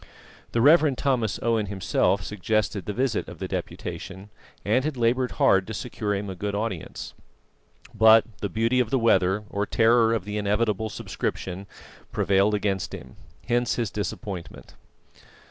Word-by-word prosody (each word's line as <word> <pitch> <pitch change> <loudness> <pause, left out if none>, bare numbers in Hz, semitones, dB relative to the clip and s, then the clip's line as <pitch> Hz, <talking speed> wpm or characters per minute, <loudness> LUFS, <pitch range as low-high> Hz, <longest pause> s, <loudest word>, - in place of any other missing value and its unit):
The 115 - +2
Rev. 150 0 +5
Thomas 125 -7 0
Owen 115 -2 +1
himself 95 0 0
suggested 105 +1 -1
the - - -3
visit 125 +1 -1
of - - -10
the - - -4
Deputation, 95 +2 -6 0.3
and 110 +6 +2
had 150 -2 -3
laboured 125 +2 +1
hard 95 -1 +3
to 110 - -5
secure 105 -2 -3
him 100 +1 -4
a 95 - -4
good 100 +2 -4
audience. 105 -5 -4 0.8
But 110 0 +6
the 100 - -3
beauty 115 +6 +1
of 120 -3 +1
the 135 - +2
weather, 105 -4 +2
or 100 0 -1
terror 115 0 +4
of 100 -5 -3
the 105 0 -3
inevitable 105 +1 0
subscription, 95 -1 -4 0.4
prevailed 100 +2 +2
against 100 -2 -2
him. - - -12 0.3
Hence 120 0 +1
his 115 -4 -2
disappointment. 100 -3 -6
105 Hz, 150 wpm, -25 LUFS, 100-115 Hz, 0.8 s, But